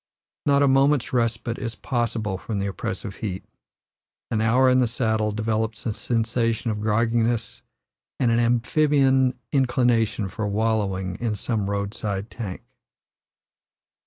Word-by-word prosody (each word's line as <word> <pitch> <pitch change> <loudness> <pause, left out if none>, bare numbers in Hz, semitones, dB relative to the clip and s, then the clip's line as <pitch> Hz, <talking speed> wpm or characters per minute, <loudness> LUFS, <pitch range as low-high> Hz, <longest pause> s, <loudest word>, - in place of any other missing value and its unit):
Not 140 0 +4
a - - +4
moment's 135 0 +3
respite 115 -1 0
is 115 -3 -4
possible 115 -6 -2
from 110 0 -4
the 100 - -1
oppressive 100 +1 -5
heat; 95 -4 -4 0.9
an 110 - +1
hour 125 +4 +4
in 130 0 +5
the 125 - +3
saddle 110 -2 0
develops 110 +1 -2
a 110 - 0
sensation 115 0 0
of 105 - -3
grogginess 115 +2 0 0.6
and 120 -2 +3
an 115 - +3
amphibian 130 +2 +3
inclination 120 -6 +2
for 105 +2 -3
wallowing 100 -3 -1
in 115 -3 -1
some 105 -1 -2
road 100 0 -2
side 105 0 -4
tank. 105 -5 -6
115 Hz, 130 wpm, -24 LUFS, 105-120 Hz, 0.9 s, in